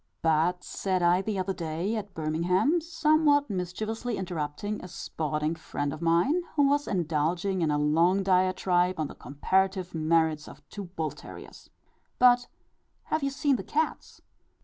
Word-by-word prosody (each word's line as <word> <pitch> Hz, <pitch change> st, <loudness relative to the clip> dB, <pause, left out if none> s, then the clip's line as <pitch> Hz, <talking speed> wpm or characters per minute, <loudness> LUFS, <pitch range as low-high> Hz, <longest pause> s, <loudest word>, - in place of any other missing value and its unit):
"But," 165 Hz, +3 st, +2 dB
said 185 Hz, -2 st, -2 dB
I, 175 Hz, +2 st, +4 dB
the 205 Hz, 0 st, -3 dB
other 190 Hz, +1 st, -1 dB
day 170 Hz, +5 st, -3 dB
at 205 Hz, -2 st, -6 dB
Birmingham, 175 Hz, -, +1 dB
somewhat 310 Hz, -4 st, +2 dB
mischievously 215 Hz, +6 st, -3 dB
interrupting 180 Hz, +3 st, -4 dB
a -, -, -7 dB
sporting 155 Hz, -2 st, -3 dB
friend 145 Hz, -3 st, -4 dB
of 155 Hz, -, -8 dB
mine, 170 Hz, -, +2 dB
who 285 Hz, -2 st, +4 dB
was 290 Hz, +1 st, +1 dB
indulging 175 Hz, +2 st, 0 dB
in 160 Hz, -, +1 dB
a 150 Hz, -, +1 dB
long 165 Hz, +6 st, +3 dB
diatribe 185 Hz, -1 st, +2 dB
on 155 Hz, -, 0 dB
the -, -, -7 dB
comparative 185 Hz, -, -1 dB
merits 160 Hz, -1 st, +1 dB
of -, -, -14 dB
two 200 Hz, -2 st, -7 dB
bull 165 Hz, -3 st, -4 dB
terriers, -, -, -12 dB, 0.5 s
"But, 245 Hz, 0 st, +5 dB, 0.6 s
have 310 Hz, -, -1 dB
you 275 Hz, -, 0 dB
seen 275 Hz, -1 st, +1 dB
the 190 Hz, -, -6 dB
cats?" 310 Hz, +9 st, -3 dB
180 Hz, 150 wpm, -28 LUFS, 160-215 Hz, 0.6 s, But